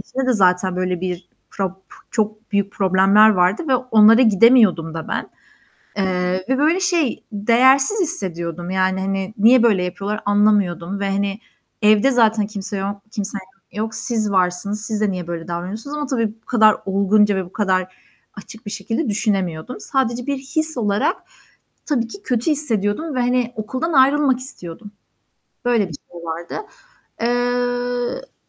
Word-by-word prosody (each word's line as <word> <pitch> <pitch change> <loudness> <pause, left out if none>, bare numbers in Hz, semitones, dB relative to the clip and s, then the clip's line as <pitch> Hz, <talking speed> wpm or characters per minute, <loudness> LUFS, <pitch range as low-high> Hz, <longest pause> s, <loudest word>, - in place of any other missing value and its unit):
içinde 265 0 -4
de 255 - +3
zaten, 185 -3 +2
böyle, 180 -1 -2
bir 180 -1 -5 0.2
prap 190 -1 -4 0.3
çok 215 0 -3
büyük 200 0 0
problemler 195 +2 +4
vardı 185 - +2
ve 265 - +3
onlara 225 -1 +5
gidemiyordum 215 -7 +4
da 160 - -6
ben. - - -4 0.7
Eee, 185 -1 -1
ve 265 - +2
böyle, 315 +6 +2
şey, 345 -8 0
değersiz 260 - +3
hissediyordum. 175 - -4
Yani, 190 0 0
hani, 195 +1 -3
niye 230 +4 +5
böyle 205 -6 +3
yapıyorlar 200 +4 -4
anlamıyordum 200 -3 +1
ve 200 0 -1
hani, 200 +1 -2 0.4
evde 215 +5 +4
zaten 220 -4 +2
kimse 205 -1 -6
yo 195 - -3 0.3
kimsem 205 -2 -4 0.3
yok. 220 +1 -4
Siz 220 -3 -2
varsınız, 190 +3 0
siz 215 0 -3
de 210 -2 +1
niye 180 -2 -5
böyle 170 0 -6
davranıyorsunuz 190 +11 -5
ama 295 - -2
tabii 235 -4 0
bu - - -42
kadar 220 -3 +4
olgunca 200 +1 +2
ve 190 -1 -2
bu 175 - -15
kadar 185 -3 -1 0.4
açık 220 +2 -12
bir 205 - -6
şekilde 225 +8 -3
düşünemiyordum. 200 -2 -2
Sadece 245 -3 -1
bir 280 -1 -1
his 310 +3 -3
olarak, 205 -3 +1 0.7
tabii 240 -7 0
ki 400 - -11
kötü 250 - -1
hissediyordum 275 0 -1
ve 255 - 0
hani, 245 -1 0
okuldan 255 +10 -3
ayrılmak 275 -1 +4
istiyordum. 205 - -9 0.7
Böyle 235 -5 +2
bir 165 - -9 0.2
şey 170 - -10
vardı. 165 +1 -6 0.6
Eee 245 - -1
210 Hz, 150 wpm, -20 LUFS, 190-245 Hz, 0.7 s, onlara